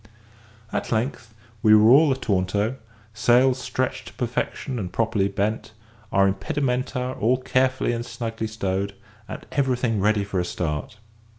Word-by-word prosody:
At - - -2
length 115 -1 -2 0.3
we 110 0 +7
were 110 +2 +6
all 145 +2 +6
ataunto; 105 -1 0 0.4
sails 125 +4 +3
stretched 130 +1 -3
to - - -10
perfection 125 +1 -3
and 90 -4 -4
properly 110 -3 +1
bent, 105 +2 -2 0.4
our 100 0 +4
impedimenta 125 +5 -1
all 120 +4 +3
carefully 130 0 +1
and 115 0 -3
snugly 115 -2 -4
stowed, 100 -2 -2 0.3
and - - -8
everything 125 -5 0
ready 105 +1 +2
for 100 -2 -2
a - - +1
start. 80 +2 -3
115 Hz, 135 wpm, -24 LUFS, 100-125 Hz, 0.4 s, we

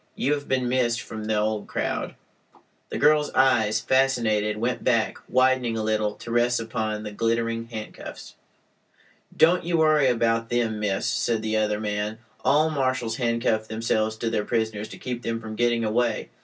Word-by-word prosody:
You 145 - +1
have 145 -1 -4
been 130 -1 0
missed 120 -1 +1
from 110 -2 -7
the 110 0 0
old 105 0 -1
crowd." - - -3 0.7
The - - -4
girl's 150 0 +4
eyes, 110 -5 +3
fascinated, 110 -5 +1
went 120 +3 -2
back, 115 -3 +1
widening 130 -2 +2
a 110 - -2
little, 110 -1 0
to 120 - -9
rest 120 +1 +2
upon 110 -2 -3
the 105 - -6
glittering 115 +1 -1
handcuffs. 110 -2 -8 1.0
"Don't 175 +3 +4
you 170 0 0
worry 155 -3 +4
about 115 -1 +1
them, 115 -3 0
miss," 100 -2 -1
said 115 -1 0
the 110 0 -1
other 105 -1 0
man. 105 0 -2 0.3
"All 155 +2 +3
marshals 130 -5 -1
handcuff 115 -2 0
themselves 110 0 -1
to 115 +1 -3
their 105 -2 0
prisoners 110 -2 -2
to - - -9
keep 125 -2 -5
them 115 -1 -2
from 110 -1 -7
getting 120 0 +1
away. 115 +2 0
115 Hz, 170 wpm, -25 LUFS, 110-125 Hz, 1.0 s, girl's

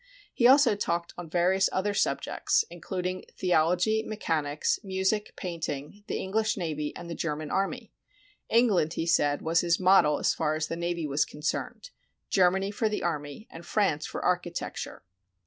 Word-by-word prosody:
He 240 - +4
also 260 -4 +6
talked 170 -3 -2
on 175 -2 -8
various 185 +3 +2
other 205 +2 0
subjects, - - +1
including 180 +1 -4
the 180 -1 0
ology, 180 +7 +3
mechanics, 155 -10 -1
music, 190 +2 -1
painting, 165 0 -5
the - - -3
Enghsh 215 +3 0
navy, 150 -5 -3
and 175 - -8
the 170 - -5
German 155 -2 -3
army. 195 0 -2 0.6
England, 210 -9 +3
he 165 - -2
said, 145 -4 +2
was 165 +1 +2
his 170 -1 +1
model 185 -5 +5
as - - +1
far 155 -1 0
as 155 0 -1
the - - -2
navy 170 -1 -2
was 145 0 +1
concerned, 155 - -4 0.4
Germany 190 +1 +3
for 215 +1 0
the 210 - -3
army, 150 +3 -4
and 165 - -10
France 170 -5 0
for - - -5
architecture. 175 -1 -2
175 Hz, 160 wpm, -28 LUFS, 160-195 Hz, 0.6 s, also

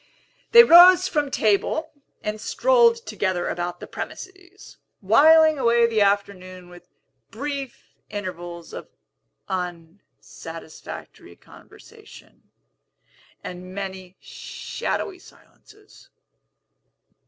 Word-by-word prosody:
They 470 0 +10
rose 365 -1 +7
from 295 -5 -1
table, 245 +9 0 0.3
and 210 0 -4
strolled 475 - +2
together 185 -3 -2
about 175 0 -4
the - - -9
premises, 380 0 -10 0.2
whiling 310 +9 +5
away 235 -1 +3
the 225 -2 0
afternoon 185 -3 -2
with 175 0 -16 0.4
brief 275 +1 -7 0.2
intervals 175 -4 -8
of - - -8 0.6
unsatisfactory 165 -2 -9
conversation, - - -18 0.9
and 185 +1 -9
many 190 -2 -8
shadowy 370 -2 -6
silences. 420 +3 -21
210 Hz, 85 wpm, -22 LUFS, -, 0.9 s, They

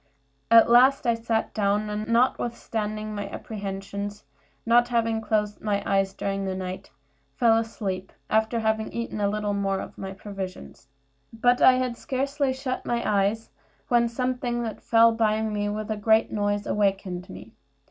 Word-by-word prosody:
At 230 0 +7
last 255 +4 +5
I 235 - +3
sat 225 -1 -2
down, 205 0 +1
and 210 +1 -4
notwithstanding 225 -3 -1
my 205 -1 -4
apprehensions, 200 0 -6 0.4
not 240 +1 +4
having 230 -2 0
closed 210 -1 -1
my 200 -2 -1
eyes 195 -1 +1
during 195 0 -2
the 190 -1 -2
night, 185 0 -6 0.5
fell 230 -3 +4
asleep, 200 -4 -3 0.2
after 220 +2 +1
having 220 0 0
eaten 235 -2 -4
a 200 - +2
little 210 0 -1
more 195 -1 0
of - - -9
my 190 0 -5
provisions. 190 - -8 0.4
But 245 +2 +2
I 260 - +8
had 255 -2 -1
scarcely 275 +1 -1
shut 260 -1 -4
my 235 0 -1
eyes 205 +2 0 0.4
when 235 -1 +3
something 245 0 -2
that 225 -2 -5
fell 230 0 +5
by 220 -1 +1
me 210 -1 -1
with 215 +1 -4
a 215 - -2
great 220 +2 +3
noise 205 -1 -1
awaked 200 -1 +1 0.2
me. 100 +4 -11
215 Hz, 155 wpm, -25 LUFS, 200-235 Hz, 0.5 s, I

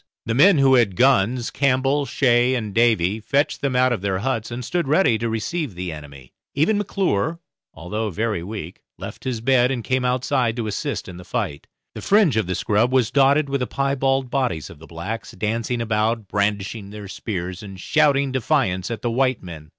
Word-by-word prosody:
The 115 - -1
men 160 - +6
who 135 -1 +5
had 115 -7 +3
guns 125 0 +2
Campbell, 135 +1 +1
Shay, 125 -1 +2
and 110 -5 -4
Davy 110 -4 +2
fetched 140 +7 0
them 135 -2 -1
out 130 0 +3
of 115 - -3
their 95 -1 -1
huts 115 +1 -2
and 120 0 -5
stood 175 +1 -1
ready 145 - +3
to 115 - -1
receive 120 - -3
the 90 -1 -4
enemy; 70 -4 -11 0.2
even 185 +9 +2
McClure, 170 - -1 0.4
although 105 +7 -3
very 105 -1 -2
weak, 95 -2 -7 0.2
left 120 - -9
his 125 -4 -2
bed 125 0 +3
and 125 -3 -2
came 130 +1 0
outside 125 -1 0
to 120 -2 -3
assist 105 - -3
in 90 - -9
the 90 - -10
fight. 70 -4 -4 0.3
The - - -8
fringe 200 - +3
of 110 -5 0
the 90 - -2
scrub 110 +6 +1
was 130 -4 +2
dotted 140 +2 +4
with 140 0 -1
the 125 - -2
piebald 135 -1 0
bodies 125 - -1
of 80 - -14
the 80 - -13
blacks, 95 +8 -6
dancing 115 +2 -2
about, 110 0 0
brandishing 100 0 -2
their 105 -1 -9
spears, 90 -2 -5
and 95 -3 -10
shouting 140 - +2
defiance 120 -9 0
at 115 -3 -5
the 120 - 0
white 130 0 +1
men. 80 -4 -10
115 Hz, 195 wpm, -22 LUFS, 100-135 Hz, 0.4 s, men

